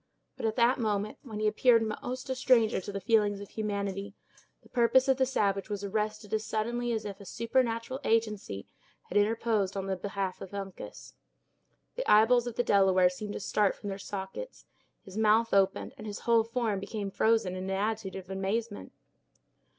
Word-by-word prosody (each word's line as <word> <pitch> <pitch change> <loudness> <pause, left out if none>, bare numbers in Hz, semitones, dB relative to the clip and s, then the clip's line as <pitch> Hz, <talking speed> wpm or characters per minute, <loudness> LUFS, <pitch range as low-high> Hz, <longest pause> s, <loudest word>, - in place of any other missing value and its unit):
But, - - -2
at 220 - -1
that 245 +2 +3
moment, 210 -2 -1
when 220 -6 -7
he 215 - 0
appeared 230 +2 +4
most 250 +4 -4
a 260 - -1
stranger 250 -6 +3
to 205 - -6
the 200 - -3
feelings 205 0 +2
of 200 - -9
humanity, 200 -1 -3 0.5
the - - -20
purpose 255 +2 +4
of 265 -1 +4
the 260 -1 +2
savage 200 -5 0
was 205 -1 -3
arrested 210 +1 -2
as 215 0 +1
suddenly 235 +2 -1
as 220 -2 -2
if 200 -1 -6
a - - -9
supernatural 230 +2 -1
agency 215 - 0 0.4
had - - 0
interposed 215 -2 +1
in 195 -1 -2
the 195 0 -1
behalf 195 0 -4
of 195 +1 -8
Uncas. 195 -1 -8 0.8
The - - -1
eyeballs 235 +3 +5
of 235 - -5
the 245 - +1
Delaware 190 -4 +4
seemed 205 +3 -6
to - - -4
start 205 0 +1
from 205 - -7
their 195 0 -5
sockets; 195 - -7 0.4
his 190 +1 -9
mouth 220 +1 +3
opened 195 -1 +2
and 215 - -7
his 205 - -6
whole 230 -1 +4
form 230 -3 -1
became 200 0 -4
frozen 220 -3 +2
in 185 0 -4
an - - -4
attitude 205 +1 -2
of 190 -1 -8
amazement. 205 +3 -3
210 Hz, 185 wpm, -30 LUFS, 195-230 Hz, 0.8 s, eyeballs